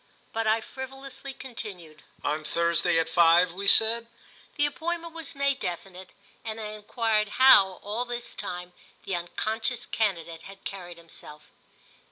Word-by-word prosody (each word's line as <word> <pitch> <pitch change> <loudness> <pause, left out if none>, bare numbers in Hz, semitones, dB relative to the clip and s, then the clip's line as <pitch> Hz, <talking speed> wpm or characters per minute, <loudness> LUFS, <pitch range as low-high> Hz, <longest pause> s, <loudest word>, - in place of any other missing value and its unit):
But 225 0 0
I 220 +1 +3
frivolously, 270 +2 -7
continued. 205 -12 -8 0.2
"On 150 +2 -1
Thursday 170 +1 +2
at 165 0 +2
five, 170 +1 +5
we 200 +2 -4
said?" 230 +3 +5 0.5
The 290 - +3
appointment 335 +3 -3
was 330 -1 -6
made 280 -1 +1
definite 185 +1 -5 0.3
and 220 0 -5
I 215 -1 -4
enquired 215 0 0
how, 245 -8 +8
all 215 +4 -1
this 240 -1 -4
time, 180 0 -5 0.3
the 195 - -2
unconscious 220 +7 -1
candidate 170 -6 -1
had 195 +2 -12
carried 175 -3 -7
himself. 160 -2 -11
210 Hz, 140 wpm, -27 LUFS, 175-245 Hz, 0.5 s, how